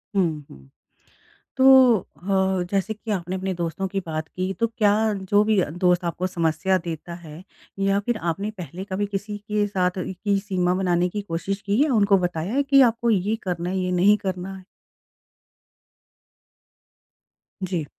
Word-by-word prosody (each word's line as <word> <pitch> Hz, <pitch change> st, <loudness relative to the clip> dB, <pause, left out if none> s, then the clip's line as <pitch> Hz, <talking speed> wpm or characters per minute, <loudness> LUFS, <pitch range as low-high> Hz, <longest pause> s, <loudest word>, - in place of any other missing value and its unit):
हुँ, 160 Hz, -6 st, 0 dB
हुँ। 65 Hz, 0 st, -15 dB, 0.9 s
तो 260 Hz, -, +3 dB, 0.4 s
अ, 190 Hz, 0 st, -1 dB
जैसे 200 Hz, +2 st, 0 dB
कि 220 Hz, +1 st, -7 dB
आपने 185 Hz, -2 st, -2 dB
अपने 190 Hz, 0 st, -2 dB
दोस्तों 170 Hz, +2 st, -3 dB
की 195 Hz, +1 st, -2 dB
बात 155 Hz, 0 st, -3 dB
की 185 Hz, +1 st, -3 dB
तो 230 Hz, -, +2 dB
क्या 220 Hz, -3 st, +2 dB, 0.2 s
जो 200 Hz, +1 st, +2 dB
भी 215 Hz, -1 st, +2 dB
दोस्त 180 Hz, +1 st, +1 dB
आपको 170 Hz, +2 st, -2 dB
समस्या 170 Hz, +2 st, +1 dB
देता 170 Hz, -1 st, -6 dB
है 155 Hz, +2 st, -10 dB, 0.4 s
या 195 Hz, 0 st, +2 dB
फिर 240 Hz, -2 st, 0 dB
आपने 200 Hz, +5 st, -4 dB
पहले 180 Hz, -3 st, -8 dB
कभी 200 Hz, +2 st, 0 dB
किसी 205 Hz, +1 st, -4 dB
के 210 Hz, 0 st, -1 dB
साथ 185 Hz, -2 st, -1 dB
इ -, -, -5 dB
की 200 Hz, +1 st, 0 dB
सीमा 185 Hz, -3 st, 0 dB
बनाने 175 Hz, 0 st, +2 dB
की 205 Hz, +3 st, -4 dB
कोशिश 195 Hz, +1 st, -4 dB
की 205 Hz, +5 st, +1 dB
है? 305 Hz, -, 0 dB
उनको 205 Hz, -5 st, +4 dB
बताया 175 Hz, +1 st, -2 dB
है 280 Hz, +2 st, +2 dB
कि 275 Hz, 0 st, +5 dB
आपको 235 Hz, -1 st, +3 dB
ये 210 Hz, 0 st, +1 dB
करना 175 Hz, -2 st, -3 dB
है, 190 Hz, -, -2 dB
ये 185 Hz, -1 st, -1 dB
नहीं 190 Hz, +4 st, +4 dB
करना 190 Hz, -1 st, -4 dB
है? 190 Hz, -, -12 dB, 3.0 s
जी। 180 Hz, -4 st, -2 dB
190 Hz, 165 wpm, -23 LUFS, 175-205 Hz, 3.0 s, कि